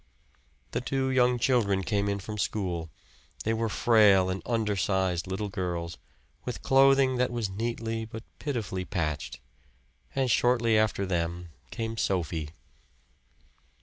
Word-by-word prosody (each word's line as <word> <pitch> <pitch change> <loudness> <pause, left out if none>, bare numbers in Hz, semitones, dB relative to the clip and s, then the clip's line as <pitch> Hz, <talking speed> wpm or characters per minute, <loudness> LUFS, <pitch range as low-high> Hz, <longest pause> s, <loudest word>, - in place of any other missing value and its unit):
The - - -1
two 135 -1 -1
young 125 -1 +3
children 110 -6 +2
came 100 0 0
in 100 - 0
from 105 +2 -6
school; 90 -5 -2 0.5
they 110 - +1
were 115 0 -1
frail 105 -5 +5
and 95 - -3
undersized 95 -5 0
little 95 +2 -3
girls, 85 -3 -4 0.4
with - - -5
clothing 135 -1 +5
that 125 0 +2
was 115 -5 -2
neatly 115 +1 -3
but 110 0 -8 0.2
pitifully 110 -10 -3
patched. 75 -5 -3 0.8
And 130 -2 +1
shortly 120 -1 +3
after 110 -2 +2
them 85 -1 -2 0.2
came 115 0 -4
Sophie. 80 -6 -1
105 Hz, 125 wpm, -28 LUFS, 95-115 Hz, 0.8 s, frail